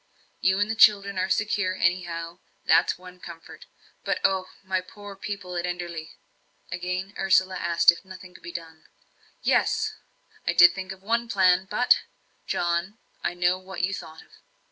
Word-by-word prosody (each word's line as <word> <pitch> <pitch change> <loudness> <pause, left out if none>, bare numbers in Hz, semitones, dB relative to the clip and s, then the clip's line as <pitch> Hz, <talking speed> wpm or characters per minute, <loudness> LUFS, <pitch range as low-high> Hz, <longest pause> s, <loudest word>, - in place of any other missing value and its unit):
You 190 0 +2
and 205 - +2
the 220 - -1
children 200 -3 +5
are 185 +1 0
secure 205 -3 0
anyhow, 175 -1 -1 0.3
that's - - +4
one 180 0 -13
comfort. 170 -2 -12 0.4
But - - -1
oh, 190 -1 +2 0.2
my 190 -1 -1
poor 205 +2 -11
people 195 -2 -6
at 175 0 -1
Enderley!" 175 -2 -5 0.6
Again 180 +2 -3
Ursula 190 -1 +3
asked 170 0 +5
if 170 - -10
nothing 185 -1 -12
could - - -15
be 175 - -8
done. 160 -2 -9 0.6
"Yes 435 -1 +2 0.5
I - - +2
did 175 0 +8
think 190 -1 -6
of 190 0 -10
one 235 +2 0
plan 185 -2 +3
but 245 +4 +4 0.2
" - - -40
"John, 175 +4 -1 0.3
I - - -1
know 175 +1 +1
what 185 -1 -7
you 195 +2 +1
thought 160 -4 -8
of." - - -26
185 Hz, 165 wpm, -26 LUFS, 175-195 Hz, 0.6 s, did